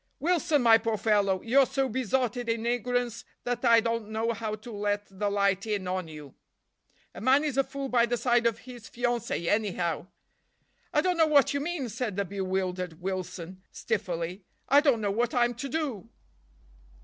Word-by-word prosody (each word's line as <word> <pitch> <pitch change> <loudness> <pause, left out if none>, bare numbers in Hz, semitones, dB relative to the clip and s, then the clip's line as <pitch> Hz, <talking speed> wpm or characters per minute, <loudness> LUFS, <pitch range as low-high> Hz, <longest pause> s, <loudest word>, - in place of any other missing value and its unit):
"Wilson, 330 -4 +2
my 225 -1 +7
poor 225 -1 -1
fellow, 200 -3 +1
you're 265 +3 +4
so 270 -1 0
besotted 250 -1 -1
in 230 0 -1
ignorance 245 -1 -1 0.2
that 245 0 -2
I 230 -2 +6
don't 230 -2 -2
know 225 +2 -1
how 220 -1 -3
to 225 +3 -11
let 205 -1 -1
the 205 -1 +1
light 200 0 +1
in 205 -3 -2
on 185 -1 -2
you. 150 -3 -10 0.8
A - - -9
man 265 +5 +4
is 295 -4 -1
a 275 - +3
fool 275 0 -5
by 240 -2 +3
the 240 +1 0
side 240 -1 +2
of 230 - 0
his 245 -3 -10
fiancée, 240 -6 -2
anyhow." 180 -5 0 0.8
"I 300 - +3
don't 360 +1 0
know 320 -1 +5
what 290 -3 +4
you 285 - 0
mean," 300 -3 -3
said 230 -2 -3
the 200 0 -1
bewildered 185 -3 -3
Wilson 185 -1 -5
stiffly. 185 -4 -3 0.2
"I 280 - +6
don't 275 -7 +3
know 205 -1 0
what 235 +4 0
I'm 240 0 +3
to 255 +4 -6
do." 255 -8 -3
230 Hz, 180 wpm, -28 LUFS, 200-250 Hz, 0.8 s, my